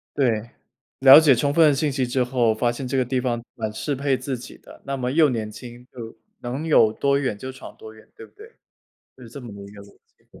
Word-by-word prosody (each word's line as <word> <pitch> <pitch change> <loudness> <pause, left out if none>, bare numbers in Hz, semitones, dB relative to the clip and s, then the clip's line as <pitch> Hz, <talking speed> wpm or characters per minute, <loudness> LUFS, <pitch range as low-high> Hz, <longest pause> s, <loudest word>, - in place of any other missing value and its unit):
对， 120 -5 0 0.5
了 135 +3 +9
解 145 -5 +4
充 140 +4 -1
分 160 -1 +5
的 145 - +3
信 150 0 -1
息 130 -2 -2
之 125 0 0
后， 120 -3 0
发 120 +1 0
现 125 +2 -6
这 135 - -2
个 130 - +2
地 125 +1 -2
方 120 -2 -3
蛮 110 -2 -4
适 145 +6 -3
配 140 0 0
自 130 0 -5
己 120 - -12
的， - - -17
那 135 - -3
么 125 -1 -3
又 155 +1 +4
年 110 -3 -4
轻， 120 +1 -12
又 115 -3 -9 0.2
能 130 +6 -5
有 110 -8 +4
多 140 +2 0
远 130 -7 -3
就 130 +4 -7
闯 130 - -12
多 110 0 -12
远， 110 - -19
对 450 +1 -12
不 - - -24
对？ 440 +3 -16 0.6
就 130 - -16
是 115 - -12
这 140 - -10
么 115 -4 -10
的 100 - -11
一 - - -10
个 100 - -13
逻 100 - -19 0.2
辑。 - - -21
125 Hz, 275 characters per minute, -22 LUFS, 115-140 Hz, 0.6 s, 了